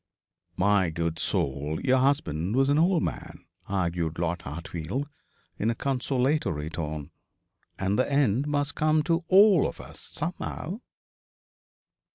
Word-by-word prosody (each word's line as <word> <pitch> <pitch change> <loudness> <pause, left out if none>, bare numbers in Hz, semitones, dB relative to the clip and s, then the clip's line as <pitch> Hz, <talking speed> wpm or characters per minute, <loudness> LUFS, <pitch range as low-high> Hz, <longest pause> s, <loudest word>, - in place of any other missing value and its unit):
'My 100 -2 +3
good 80 0 -2
soul, 70 +3 -1
your 130 0 +4
husband 115 - +1
was 135 +1 +3
an 145 +2 +3
old 170 0 +3
man,' 90 - -5 0.2
argued 85 -4 -1
Lord 85 0 -1
Hartfield, 85 - -4 0.5
in 110 - +1
a 115 - 0
consolatory 130 - 0
tone, 75 -3 -5 0.7
'and 100 +3 0
the 130 - +1
end 140 -1 +2
must 145 -1 0
come 155 0 +2
to 165 +2 +1
all 195 -4 +6
of - - -8
us - - -10
somehow.' 175 - -5
115 Hz, 130 wpm, -27 LUFS, -, 0.7 s, all